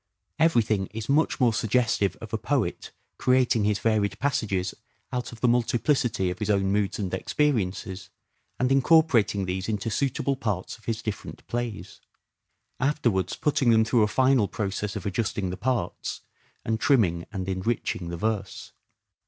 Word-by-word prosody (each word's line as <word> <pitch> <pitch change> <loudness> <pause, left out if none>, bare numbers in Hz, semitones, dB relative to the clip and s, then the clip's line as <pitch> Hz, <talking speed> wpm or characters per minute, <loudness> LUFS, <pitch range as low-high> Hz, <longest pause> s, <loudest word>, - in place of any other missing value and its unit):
Everything 110 - +2
is 110 0 -7
much 150 +4 +2
more 120 -3 +4
suggestive 110 -4 +1
of - - -9
a - - +2
poet - - -1 0.3
creating 125 -4 +3
his 105 -1 +2
varied 105 -1 +1
passages 100 -9 -1 0.4
out 125 -1 -3
of 120 - -12
the 125 - +3
multiplicity 120 -4 +1
of 90 - -7
his 105 -1 -2
own 95 -2 +2
moods 100 0 0
and 95 -4 -3
experiences; 100 -9 -1 0.5
and 125 +1 +1
incorporating 135 - +4
these 95 +3 -3
into 110 +1 -2
suitable 135 +3 0
parts 105 -8 -3
of 110 - -21
his 115 -1 -3
different 110 - -6
plays: 120 -3 -5 0.8
afterwards 120 - +1
putting 140 -4 +1
them 110 -1 +5
through 115 0 +3
a 105 - +4
final 130 -1 +3
process 100 0 -3
of - - -5
adjusting 100 -2 -1
the - - -4
parts, 125 +2 -2 0.4
and 110 0 0
trimming 95 - +2
and 95 -1 -4
enriching 95 -2 -2
the 85 - -4
verse. 105 0 -3
110 Hz, 155 wpm, -26 LUFS, 100-125 Hz, 0.8 s, them